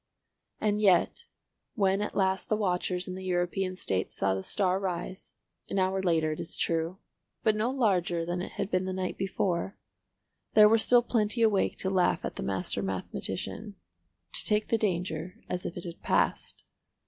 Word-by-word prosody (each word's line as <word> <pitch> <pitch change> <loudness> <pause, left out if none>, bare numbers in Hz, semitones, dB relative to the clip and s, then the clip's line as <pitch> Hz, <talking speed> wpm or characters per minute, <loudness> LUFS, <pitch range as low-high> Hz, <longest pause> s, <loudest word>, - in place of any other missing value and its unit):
And 210 0 +1
yet, 185 -5 +3 0.5
when 195 -2 +2
at 210 - -3
last 190 -1 +1
the 215 - +3
watchers 180 -2 -1
in 185 - -4
the 190 +1 -7
European 185 +1 -1
States 95 - -2
saw 95 0 +1
the 95 - -2
star 185 - +1
rise, 185 -1 -5 0.3
an - - -2
hour 190 0 +1
later 165 -4 +2
it 155 - -5
is - - -2
true, 165 +2 0 0.5
but 215 -1 +3
no 215 +3 0
larger 185 -10 +1
than 175 +1 -2
it - - -6
had 200 - -3
been 185 0 +1
the 185 - -2
night 185 -1 -2
before, 190 0 -1 0.8
there 210 -1 +9
were 225 +1 +4
still 240 +2 +5
plenty 230 -1 +1
awake 210 -3 +2
to 190 - -1
laugh 180 -2 +2
at - - -4
the - - -5
master 95 0 -2
mathematician—to 100 - -4
take 210 0 +2
the 230 - +3
danger 180 -3 -2
as 180 - -3
if 170 - -7
it 175 - -6
had 170 -2 -8
passed. - - 0
185 Hz, 175 wpm, -29 LUFS, 175-210 Hz, 0.8 s, there